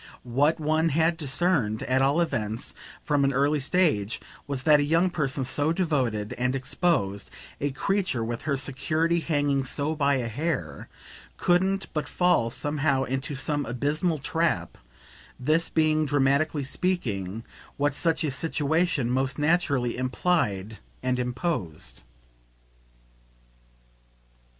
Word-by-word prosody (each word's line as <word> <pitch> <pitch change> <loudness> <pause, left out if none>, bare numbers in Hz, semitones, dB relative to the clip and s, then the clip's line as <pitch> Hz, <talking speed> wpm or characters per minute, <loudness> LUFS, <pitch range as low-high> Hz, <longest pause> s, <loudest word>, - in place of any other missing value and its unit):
What 140 +7 +1
one 155 +2 +2
had 160 +3 +2
discerned, 145 -7 0
at 130 +1 +1
all 140 +5 +3
events, 115 -8 -2 0.3
from 145 -2 +1
an 135 - +3
early 140 +3 +2
stage, 135 - +1 0.3
was 135 -2 -3
that 150 -2 +6
a - - +2
young 165 +5 +2
person 135 -5 -1
so 145 +4 +1
devoted 130 - 0
and 125 +1 +1
exposed, 130 - 0 0.3
a 145 - 0
creature 180 - -1
with 120 0 -4
her 140 -3 -1
security 155 +5 0
hanging 145 -4 0
so 140 +4 0
by 140 -2 +2
a 125 -3 -1
hair, 115 - -3 0.5
couldn't 190 +2 +2
but 150 -2 -2
fall 175 -10 +2
somehow 145 +1 0
into 135 +2 -3
some 145 +1 -1
abysmal 150 +7 -1
trap 145 - -1 0.6
this 155 +6 +1
being, 155 -1 +2
dramatically 140 +2 +2
speaking, 115 - -2 0.3
what 145 0 +1
such 165 +2 0
a 150 - 0
situation 160 0 0
most 130 +2 0
naturally 145 -6 +1
implied 125 - -1 0.2
and 125 0 0
imposed. 120 - -3
145 Hz, 125 wpm, -26 LUFS, 125-160 Hz, 0.6 s, that